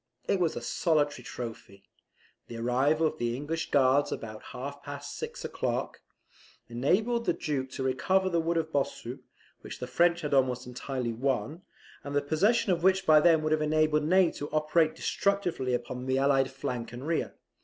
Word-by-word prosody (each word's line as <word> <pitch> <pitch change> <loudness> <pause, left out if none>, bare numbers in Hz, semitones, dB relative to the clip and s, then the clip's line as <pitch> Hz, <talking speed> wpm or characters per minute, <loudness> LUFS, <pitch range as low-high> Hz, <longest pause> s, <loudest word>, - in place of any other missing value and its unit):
It 195 - +2
was 170 -3 +1
a - - -4
solitary 145 +5 0
trophy. 110 -5 -8 0.6
The 115 - -7
arrival 130 +7 +2
of 155 0 -1
the 120 0 -1
English 155 +4 -3
Guards 140 +1 +3
about 110 -1 -6
half 140 +3 -7
past 145 0 -7
six 465 +1 -6
o'clock, - - -3 0.7
enabled 215 - +1
the - - +2
Duke 135 -3 -3
to 135 - -3
recover 185 +9 +1
the 170 -2 +1
wood 165 +1 0
of 160 -1 -1
Bossu, 135 -2 -2 0.4
which - - -9
the 125 - -5
French 170 +7 +2
had 150 -3 -3
almost 130 -2 +2
entirely 125 -1 -4
won, 130 - -2 0.4
and 140 0 -5
the 145 - +3
possession 195 +9 +2
of 170 -2 +1
which 190 +1 +3
by 155 -2 +7
them 160 0 +4
would 155 - 0
have 155 0 +2
enabled 155 0 +2
Ney 185 +1 +4
to 145 - -6
operate 155 +1 +2
destructively 180 -11 0
upon 125 +1 -5
the 130 0 +1
allied 135 -1 +3
flank 125 -3 -5
and 125 +3 -7
rear. 165 0 -1
145 Hz, 175 wpm, -29 LUFS, 130-165 Hz, 0.7 s, by